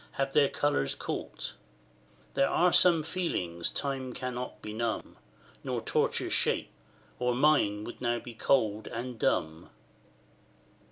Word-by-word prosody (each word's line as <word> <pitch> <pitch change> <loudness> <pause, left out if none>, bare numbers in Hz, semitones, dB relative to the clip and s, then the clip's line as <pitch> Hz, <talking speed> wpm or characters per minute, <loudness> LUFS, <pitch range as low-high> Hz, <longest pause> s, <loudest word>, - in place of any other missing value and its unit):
have 135 0 -1
their 145 -2 +5
colours 145 - 0
caught: - - -5 0.8
There 135 - +3
are 180 0 +3
some 170 -3 +6
feelings 95 - -2
Time 135 -3 -1
cannot 125 0 -4
benumb, 110 +2 -3 0.5
Nor - - -2
torture - - 0
shake, - - +2 0.5
or 125 0 +1
mine 125 -7 +3
would 120 - -8
now 120 -1 +1
be 120 0 -8
cold 110 -3 +1
and 120 0 -5
dumb. 80 -3 0
125 Hz, 120 wpm, -30 LUFS, 110-140 Hz, 0.8 s, some